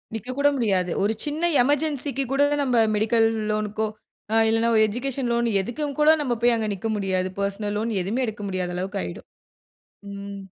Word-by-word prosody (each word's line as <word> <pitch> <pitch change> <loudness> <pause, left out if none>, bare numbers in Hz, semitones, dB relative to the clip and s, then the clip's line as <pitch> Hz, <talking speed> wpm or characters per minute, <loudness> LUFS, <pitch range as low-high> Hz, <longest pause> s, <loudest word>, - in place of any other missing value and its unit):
நிக்க 225 +3 -6
கூட 285 0 +4
முடியாது. 190 -7 +1
ஒரு 210 +2 +2
சின்ன 310 +4 0
எமர்ஜென்சிக்கு 285 0 0
கூட 275 +1 +3 0.2
நம்ம 255 -3 0 0.2
மெடிக்கல் 225 +2 +3 0.2
லோன்க்கோ, 215 +1 -1 0.6
இல்லன்னா 225 +1 +2
ஒரு 220 - +5
எஜிகேஷன் 250 +3 -3
லோன் 235 0 +1
எதுக்கும் 280 +8 -4
கூட 300 +1 +5
நம்ம 260 -4 0
போயி 240 0 +5
அங்கு 220 -2 -1
நிக்க 195 +4 -4
முடியாது. 190 -2 -1
பெர்சனல் 200 +1 -2
லோன் 230 +2 -2
எதுமே 225 +8 -1
எடுக்க 215 -2 -6
முடியாத 180 -2 -2
அளவுக்கு 190 +2 -3
ஆயிடும். 85 -1 -8 0.9
ம். 200 0 -7
225 Hz, 165 wpm, -24 LUFS, 200-265 Hz, 0.9 s, ஒரு